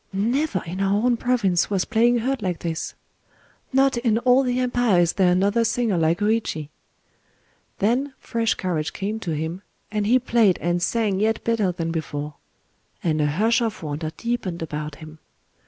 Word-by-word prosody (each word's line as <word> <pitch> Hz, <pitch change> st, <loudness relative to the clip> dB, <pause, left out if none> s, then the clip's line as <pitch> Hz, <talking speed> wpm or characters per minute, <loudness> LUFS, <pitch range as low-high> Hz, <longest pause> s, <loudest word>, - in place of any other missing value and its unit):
—"Never 225 Hz, -, 0 dB
in 180 Hz, +3 st, -5 dB
our 195 Hz, 0 st, +2 dB
own 250 Hz, -1 st, +3 dB
province 220 Hz, -8 st, +1 dB
was 195 Hz, -3 st, 0 dB
playing 235 Hz, +2 st, +3 dB
heard 255 Hz, +2 st, -1 dB
like 180 Hz, -4 st, -1 dB
this!"—"Not 260 Hz, -, -3 dB
in 235 Hz, -2 st, +1 dB
all 250 Hz, +2 st, +4 dB
the 250 Hz, -1 st, 0 dB
empire 245 Hz, -6 st, +2 dB
is 170 Hz, -1 st, +3 dB
there 185 Hz, -2 st, +3 dB
another 200 Hz, +6 st, +2 dB
singer 230 Hz, -2 st, 0 dB
like 165 Hz, 0 st, +2 dB
Hōïchi!" 210 Hz, -8 st, -1 dB, 1.1 s
Then 260 Hz, +7 st, 0 dB
fresh 230 Hz, -1 st, -1 dB
courage 165 Hz, -5 st, -2 dB
came 210 Hz, +3 st, -3 dB
to 170 Hz, -7 st, -3 dB
him, 160 Hz, +4 st, -4 dB, 0.3 s
and 210 Hz, -1 st, -1 dB
he 245 Hz, +4 st, +5 dB
played 230 Hz, -6 st, +3 dB
and 175 Hz, +1 st, -1 dB
sang 205 Hz, 0 st, 0 dB
yet 220 Hz, +1 st, 0 dB
better 220 Hz, -5 st, +1 dB
than 165 Hz, -1 st, -3 dB
before; 150 Hz, -2 st, -4 dB, 0.7 s
and 155 Hz, -3 st, +1 dB
a 150 Hz, -, +2 dB
hush 220 Hz, -, +2 dB
of 220 Hz, -6 st, -2 dB
wonder 155 Hz, +1 st, -3 dB
deepened 230 Hz, -8 st, -3 dB
about 150 Hz, -1 st, -5 dB
him. 155 Hz, +1 st, -12 dB
205 Hz, 165 wpm, -23 LUFS, 170-235 Hz, 1.1 s, he